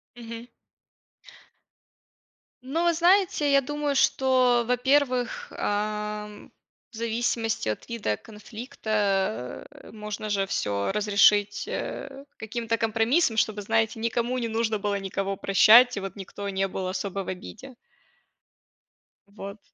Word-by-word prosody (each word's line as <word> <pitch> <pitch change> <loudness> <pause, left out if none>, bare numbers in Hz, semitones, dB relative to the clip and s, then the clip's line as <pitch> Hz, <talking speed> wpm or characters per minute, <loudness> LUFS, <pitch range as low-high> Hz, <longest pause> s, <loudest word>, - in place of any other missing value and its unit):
Мгм. 230 0 -9 2.1
Ну, 280 +7 -2
вы 340 - +4
знаете, 345 -3 +3
я 275 0 +5
думаю, 295 +1 -2
что, 255 -3 +3
во-первых, 250 0 +1
эм, 210 0 -3 0.4
в - - -14
зависимости 230 - -1
от 105 - -5
вида 230 - -1
конфликта, 210 - -3
э, - - -14
можно 210 0 -6
же 200 -1 +1
всё 100 - -1
разрешить, 205 0 +3
э, 275 0 -5
каким-то 230 +1 -3
компромиссом, 225 +5 +2
чтобы, 215 -1 +1
знаете, 225 +3 0
никому 235 +2 -1
не 235 - -2
нужно 225 -1 0
было 200 0 -1
никого 195 0 -3
прощать 225 +6 +6
и - - 0
вот 195 0 -6
никто 200 0 -7
не 195 0 0
был 190 0 -4
особо 195 +1 -3
в - - -14
обиде. 225 +7 -8 1.5
Вот. 200 +1 -9
220 Hz, 120 wpm, -26 LUFS, 200-245 Hz, 2.1 s, прощать